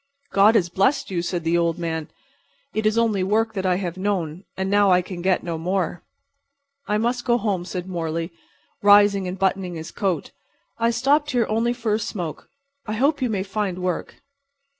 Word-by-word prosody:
"God 205 +3 +6
has 180 -6 +3
blessed 195 - +1
you," 175 -2 0
said 175 0 -3
the 165 +1 +1
old 170 0 +1
man. 160 -2 -3 0.6
"It 215 0 +1
is 215 +1 +1
only 225 -4 +2
work 220 +3 +1
that 190 -2 -1
I 180 - +3
have 180 -1 -3
known. 185 -3 -2
And 190 0 -1
now 205 0 +4
I 180 -1 +4
can 175 -1 -7
get 185 0 +1
no 170 -2 -3
more." 180 +1 -1 0.9
"I 210 - +1
must 240 +2 0
go 240 -1 +3
home," 195 -6 -1
said 180 0 -5
Morley, 165 -1 -3 0.5
rising 205 -1 +5
and 180 +1 -4
buttoning 190 -2 0
his 160 0 -7
coat. 190 -4 -2 0.5
"I 230 0 +3
stopped 280 +6 +2
here 245 -5 +2
only 225 +2 +1
for 230 -3 -1
a 215 - +1
smoke. 175 -7 -5 0.4
I 215 - -2
hope 280 +6 +1
you 250 - +1
may 200 -3 -1
find 195 -2 -2
work." 180 - -4
195 Hz, 190 wpm, -23 LUFS, 175-220 Hz, 0.9 s, God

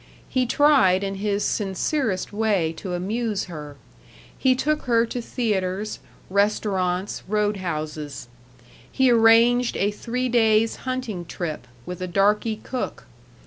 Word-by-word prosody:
He 255 -1 0
tried 250 -10 +4
in 195 0 -2
his 205 -1 0
sincerest 205 - -1
way 205 -7 +1
to 180 -3 -4
amuse 210 +3 -2
her. 150 -5 -8 0.6
He 260 -1 +3
took 305 +4 -1
her 235 -2 +3
to 240 +1 -4
theaters, 210 -4 -2 0.3
restaurants, 195 -2 0
road 210 0 0
houses. 155 -6 -5 0.6
He 265 -1 +3
arranged 235 +1 +5
a 200 +1 +1
three 245 +4 -3
days' 225 -2 +3
hunting 245 -8 -3
trip, 155 -7 -5 0.2
with 180 0 -7
a 185 - -2
darky 210 +4 +2
cook. 255 -2 -4
210 Hz, 125 wpm, -23 LUFS, 185-235 Hz, 0.6 s, arranged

